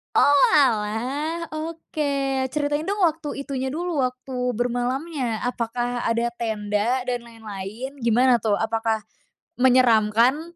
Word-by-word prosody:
Oh, 285 Hz, -, +6 dB, 0.2 s
alah. 265 Hz, +6 st, +1 dB
Oke, 290 Hz, -4 st, -2 dB
ceritain 295 Hz, +1 st, -1 dB
dong 405 Hz, +1 st, -1 dB
waktu 305 Hz, -4 st, 0 dB
itunya 265 Hz, -2 st, -3 dB
dulu, 330 Hz, +3 st, -2 dB
waktu 255 Hz, +1 st, -6 dB, 0.2 s
bermalamnya 245 Hz, +1 st, -2 dB
apakah 245 Hz, 0 st, -2 dB
ada 230 Hz, +1 st, 0 dB
tenda 220 Hz, +2 st, 0 dB
dan 250 Hz, -1 st, -2 dB
lain-lain? 225 Hz, +4 st, -7 dB
Gimana 240 Hz, +1 st, +4 dB
tuh, 210 Hz, -1 st, +1 dB
apakah 225 Hz, 0 st, -1 dB, 0.6 s
menyeramkan? 250 Hz, +5 st, +3 dB
250 Hz, 110 wpm, -23 LUFS, 230-285 Hz, 0.6 s, Oh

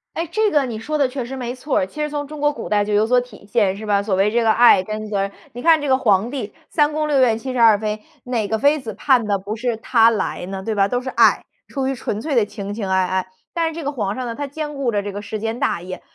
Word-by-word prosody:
哎， 330 Hz, -, -1 dB
这 435 Hz, +1 st, +2 dB
个 295 Hz, -7 st, +2 dB
你 235 Hz, -3 st, -5 dB
说 305 Hz, +7 st, -2 dB
的 280 Hz, -3 st, +3 dB
确 255 Hz, 0 st, -4 dB
实 255 Hz, +3 st, -6 dB
没 245 Hz, -2 st, -4 dB
错 260 Hz, +3 st, -2 dB
儿。 -, -, +2 dB
其 300 Hz, -, -7 dB
实 300 Hz, -, -1 dB
从 290 Hz, -1 st, -3 dB
中 305 Hz, +1 st, -9 dB
国 295 Hz, 0 st, +3 dB
古 295 Hz, -, -7 dB
代 205 Hz, -1 st, +2 dB
就 210 Hz, +1 st, -2 dB
有 210 Hz, +1 st, +4 dB
所 250 Hz, +2 st, +3 dB
体 245 Hz, -5 st, -14 dB
现， 205 Hz, -3 st, +1 dB
是 215 Hz, -, -7 dB
吧？ 205 Hz, -1 st, +2 dB
所 200 Hz, -2 st, -1 dB
谓 195 Hz, +2 st, +2 dB
这 235 Hz, +2 st, +2 dB
个 220 Hz, -, +4 dB
爱 225 Hz, -4 st, +6 dB
跟 215 Hz, +2 st, -5 dB
责 205 Hz, -2 st, -1 dB
任。 195 Hz, 0 st, -2 dB, 0.2 s
你 245 Hz, -, -7 dB
看 325 Hz, +1 st, +5 dB
这 290 Hz, -, -3 dB
个 260 Hz, -, +4 dB
皇 215 Hz, -4 st, +2 dB
帝， 240 Hz, -7 st, -4 dB, 0.2 s
三 300 Hz, -2 st, +2 dB
宫 305 Hz, 0 st, -1 dB
六 290 Hz, -2 st, +2 dB
院 235 Hz, -4 st, +4 dB
七 260 Hz, +3 st, -5 dB
十 255 Hz, -, -2 dB
二 225 Hz, -3 st, +7 dB
妃， 215 Hz, 0 st, -3 dB, 0.2 s
哪 235 Hz, -4 st, -1 dB
个 220 Hz, -, 0 dB
妃 285 Hz, +6 st, +3 dB
子 225 Hz, -5 st, -6 dB
盼 255 Hz, -1 st, +3 dB
的 205 Hz, -1 st, +1 dB
不 200 Hz, +3 st, -5 dB
是 235 Hz, 0 st, -2 dB
他 225 Hz, 0 st, +4 dB
来 215 Hz, -5 st, -2 dB
呢， 190 Hz, 0 st, -5 dB
对 220 Hz, -, -2 dB
吧？ 200 Hz, -1 st, +3 dB
都 245 Hz, -, -1 dB
是 255 Hz, +1 st, -5 dB
爱， -, -, +4 dB, 0.2 s
出 270 Hz, -2 st, -2 dB
于 270 Hz, -, 0 dB
纯 215 Hz, -4 st, -4 dB
粹 285 Hz, +4 st, -2 dB
的 235 Hz, -, +4 dB
情 205 Hz, -1 st, -6 dB
情 205 Hz, -3 st, -4 dB
爱 190 Hz, 0 st, +2 dB
爱。 185 Hz, 0 st, -1 dB, 0.3 s
但 335 Hz, -1 st, 0 dB
是 325 Hz, -, -4 dB
这 330 Hz, -, -5 dB
个 285 Hz, -, -1 dB
皇 210 Hz, -7 st, -2 dB
上 255 Hz, -, -4 dB
呢， 235 Hz, -, -4 dB
他 285 Hz, +4 st, -4 dB
兼 295 Hz, +1 st, -5 dB
顾 270 Hz, -4 st, -1 dB
着 205 Hz, -2 st, -1 dB
这 205 Hz, -, -4 dB
个 205 Hz, +1 st, -6 dB
世 215 Hz, +1 st, -5 dB
间 225 Hz, +2 st, -3 dB
大 -, -, 0 dB
业， 185 Hz, +1 st, -7 dB
230 Hz, 330 characters per minute, -20 LUFS, 205-275 Hz, 0.3 s, 二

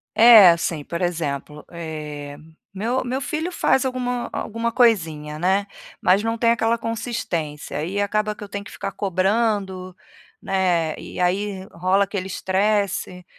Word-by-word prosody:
É 220 Hz, -5 st, +9 dB
assim, 165 Hz, -2 st, 0 dB
por 170 Hz, +4 st, -5 dB
exemplo: 150 Hz, -4 st, -3 dB
eh, 150 Hz, -4 st, -6 dB, 0.4 s
meu 230 Hz, +6 st, -1 dB
meu 255 Hz, +2 st, -2 dB
filho 315 Hz, +5 st, -2 dB
faz 265 Hz, -6 st, +2 dB
alguma 250 Hz, -1 st, -2 dB
alguma 230 Hz, +2 st, -2 dB
coisinha, 160 Hz, -, +1 dB
né, 190 Hz, +4 st, +2 dB, 0.4 s
mas 185 Hz, +3 st, +4 dB
não 225 Hz, +1 st, -1 dB
tem 230 Hz, 0 st, +3 dB
aquela 230 Hz, 0 st, +1 dB
consistência. 215 Hz, -, -4 dB
Aí 190 Hz, +7 st, -2 dB
acaba 210 Hz, +1 st, 0 dB
que -, -, -10 dB
eu 205 Hz, -, -9 dB
tenho 200 Hz, 0 st, -5 dB
que -, -, -11 dB
ficar 195 Hz, 0 st, -5 dB
cobrando, 190 Hz, -1 st, -1 dB, 0.5 s
né, 175 Hz, -5 st, 0 dB
e -, -, -9 dB
aí 190 Hz, +2 st, 0 dB
rola 185 Hz, +4 st, +2 dB
aquele 195 Hz, -1 st, -4 dB
estresse, 190 Hz, -1 st, -1 dB
195 Hz, 145 wpm, -22 LUFS, 170-225 Hz, 0.5 s, É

